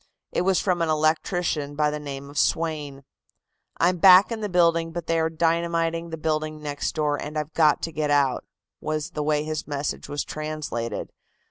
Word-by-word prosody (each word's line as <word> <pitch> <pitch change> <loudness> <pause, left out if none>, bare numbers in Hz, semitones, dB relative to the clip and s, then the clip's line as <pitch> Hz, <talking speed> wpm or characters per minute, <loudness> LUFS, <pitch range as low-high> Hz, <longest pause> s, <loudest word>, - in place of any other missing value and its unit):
It - - 0
was 190 0 +2
from 180 -3 0
an 165 - +1
electrician 155 -1 0
by 150 0 +2
the 150 - -4
name 140 -1 -7
of 145 - -2
Swain. 150 -4 -1 0.7
"I'm 180 +2 +2
back 190 +4 +8
in 225 -1 -3
the 210 - -2
building, 170 -2 +2
but 170 0 -5
they 165 0 +1
are 160 0 +1
dynamiting 165 0 0
the 160 - -5
building 155 0 -2
next 145 -1 -3
door, 150 -2 0
and 150 +1 -5
I've 150 +1 -3
got 155 -2 +3
to 165 - -2
get 155 -1 -2
out," 140 -3 +2 0.4
was 155 -1 -3
the 150 - -3
way 150 0 +1
his 155 0 -4
message 145 -1 -3
was 145 0 -2
translated. 155 -6 -4
155 Hz, 190 wpm, -25 LUFS, 150-165 Hz, 0.7 s, back